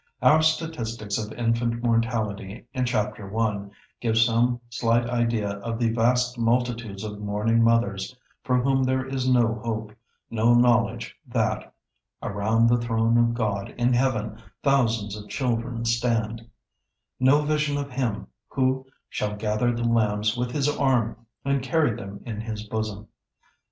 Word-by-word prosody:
Our 155 Hz, +1 st, +6 dB
statistics 120 Hz, -10 st, -1 dB
of 105 Hz, 0 st, -5 dB
infant 115 Hz, 0 st, 0 dB
mortality 115 Hz, -3 st, -1 dB
in 130 Hz, -2 st, 0 dB
Chapter 105 Hz, -3 st, -2 dB
I 100 Hz, -3 st, -1 dB, 0.3 s
give 115 Hz, -2 st, +1 dB
some 120 Hz, +2 st, +3 dB
slight 120 Hz, 0 st, +1 dB
idea 115 Hz, -4 st, 0 dB
of 115 Hz, +2 st, -4 dB
the 115 Hz, -1 st, +1 dB
vast 125 Hz, +2 st, +1 dB
multitudes 115 Hz, -3 st, 0 dB
of 105 Hz, -1 st, -6 dB
mourning 105 Hz, +3 st, +1 dB
mothers 115 Hz, -1 st, +1 dB, 0.3 s
for 125 Hz, -2 st, +2 dB
whom 135 Hz, +1 st, +2 dB
there 130 Hz, 0 st, +1 dB
is 130 Hz, -1 st, -1 dB
no 120 Hz, -3 st, +3 dB
hope, 110 Hz, -2 st, -3 dB, 0.4 s
no 115 Hz, +1 st, +4 dB
knowledge 120 Hz, -1 st, +2 dB
that, -, -, -1 dB, 0.5 s
"around 110 Hz, +3 st, +1 dB
the 120 Hz, +1 st, +4 dB
throne 115 Hz, 0 st, +1 dB
of 115 Hz, 0 st, +3 dB
God 100 Hz, -4 st, -2 dB
in 120 Hz, +1 st, +2 dB
heaven, 115 Hz, -4 st, 0 dB, 0.2 s
thousands 115 Hz, -7 st, +2 dB
of 105 Hz, -1 st, -10 dB
children 115 Hz, -2 st, -2 dB
stand;" 115 Hz, -1 st, 0 dB, 0.7 s
no 135 Hz, +4 st, +5 dB
vision 150 Hz, -1 st, 0 dB
of 140 Hz, -1 st, -4 dB
Him 125 Hz, -5 st, -2 dB, 0.2 s
who 130 Hz, 0 st, 0 dB, 0.2 s
"shall 105 Hz, 0 st, -3 dB
gather 105 Hz, +3 st, 0 dB
the 120 Hz, 0 st, -2 dB
lambs 110 Hz, -2 st, +2 dB
with 125 Hz, 0 st, -1 dB
His 140 Hz, +2 st, 0 dB
arm 130 Hz, -6 st, +1 dB, 0.3 s
and 140 Hz, -1 st, +1 dB
carry 140 Hz, -3 st, +1 dB
them 100 Hz, -3 st, -8 dB
in 110 Hz, -3 st, -4 dB
His 110 Hz, -1 st, -5 dB
bosom." 110 Hz, -1 st, -4 dB
115 Hz, 145 wpm, -25 LUFS, 110-125 Hz, 0.7 s, Our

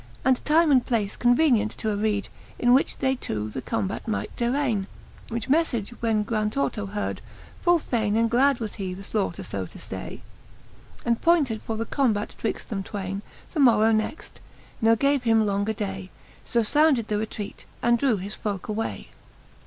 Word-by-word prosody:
And 260 Hz, -1 st, +3 dB
time 315 Hz, +1 st, +4 dB
and 255 Hz, -3 st, +5 dB
place 215 Hz, -5 st, -1 dB
convenient 245 Hz, -3 st, +3 dB
to 220 Hz, -, -3 dB
areed, 205 Hz, 0 st, 0 dB, 0.3 s
In 245 Hz, 0 st, +4 dB
which 265 Hz, -, +2 dB
they 265 Hz, -1 st, +1 dB
two 110 Hz, -, -3 dB
the 130 Hz, -, -4 dB
combat 195 Hz, -, -3 dB
might 215 Hz, -, -3 dB
darralne. 235 Hz, -5 st, 0 dB, 0.4 s
Which 230 Hz, -1 st, -3 dB
meflage 265 Hz, -8 st, +1 dB
when 220 Hz, -2 st, +2 dB
Grantorto 215 Hz, 0 st, -1 dB
heard, 205 Hz, +1 st, -3 dB, 0.4 s
full 350 Hz, -1 st, +5 dB
fayne 220 Hz, -8 st, -1 dB
And 230 Hz, +1 st, +3 dB
glad 260 Hz, +3 st, +3 dB
he 235 Hz, -, -5 dB
was 215 Hz, -, -4 dB
the 190 Hz, -3 st, -5 dB
flaiighter 195 Hz, -4 st, -1 dB
fb 95 Hz, -3 st, -4 dB
to -, -, -12 dB
ftay, -, -, -7 dB, 0.8 s
And 235 Hz, -1 st, +1 dB
pointed 290 Hz, -10 st, +3 dB
for 225 Hz, -, -4 dB
the 225 Hz, -, -2 dB
combat 220 Hz, -7 st, 0 dB
twixt 225 Hz, -, -3 dB
them 200 Hz, -3 st, -2 dB
twayne 195 Hz, 0 st, -4 dB, 0.3 s
The 320 Hz, -, -2 dB
morrow 225 Hz, -5 st, +5 dB
next, 220 Hz, +8 st, -2 dB, 0.4 s
ne 225 Hz, 0 st, +5 dB
gave 280 Hz, +3 st, +2 dB
him 225 Hz, -2 st, +3 dB
longer 200 Hz, +1 st, 0 dB
day. 195 Hz, -3 st, -4 dB, 0.4 s
So 235 Hz, -2 st, +1 dB
founded 280 Hz, -1 st, +3 dB
the 210 Hz, -, 0 dB
retraite, 215 Hz, -1 st, -6 dB, 0.2 s
and 235 Hz, 0 st, +4 dB
drew 250 Hz, -5 st, +2 dB
his 195 Hz, +3 st, -6 dB
folke 200 Hz, -4 st, -4 dB
away. 215 Hz, +1 st, -3 dB
225 Hz, 170 wpm, -25 LUFS, 205-250 Hz, 0.8 s, and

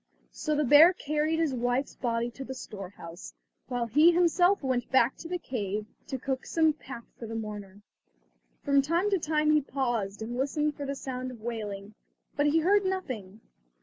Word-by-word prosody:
So 305 Hz, -1 st, -2 dB
the 300 Hz, -, +2 dB
bear 295 Hz, +6 st, +8 dB
carried 305 Hz, 0 st, -1 dB
his 320 Hz, -4 st, +1 dB
wife's 245 Hz, +2 st, -1 dB
body 235 Hz, -1 st, -2 dB
to 270 Hz, -, -8 dB
the 265 Hz, 0 st, -7 dB
storehouse, 180 Hz, -, -9 dB, 0.3 s
while 245 Hz, -1 st, -1 dB
he 300 Hz, +9 st, +5 dB
himself 355 Hz, +1 st, +3 dB
went 255 Hz, -2 st, -1 dB
back 260 Hz, -1 st, +4 dB
to 330 Hz, -, -8 dB
the 360 Hz, +1 st, -2 dB
cave 210 Hz, -, -3 dB, 0.2 s
to 265 Hz, -, -3 dB
cook 260 Hz, 0 st, -3 dB
some 320 Hz, -2 st, +3 dB
pap 265 Hz, -5 st, -10 dB
for 230 Hz, -, -6 dB
the 225 Hz, -, -6 dB
mourner. 205 Hz, -2 st, -7 dB, 0.8 s
From 280 Hz, -1 st, +4 dB
time 340 Hz, +8 st, 0 dB
to 390 Hz, -, +2 dB
time 305 Hz, -1 st, +1 dB
he 305 Hz, 0 st, +4 dB
paused 240 Hz, -7 st, -2 dB
and 235 Hz, +2 st, -5 dB
listened 295 Hz, +2 st, 0 dB
for 285 Hz, -2 st, -5 dB
the 280 Hz, -, -2 dB
sound 255 Hz, -1 st, -5 dB
of 240 Hz, -3 st, -11 dB
wailing, 210 Hz, -3 st, -5 dB, 0.4 s
but 290 Hz, 0 st, +2 dB
he 320 Hz, +2 st, +3 dB
heard 400 Hz, +4 st, +4 dB
nothing. 255 Hz, -, -4 dB
265 Hz, 180 wpm, -28 LUFS, 230-305 Hz, 0.8 s, bear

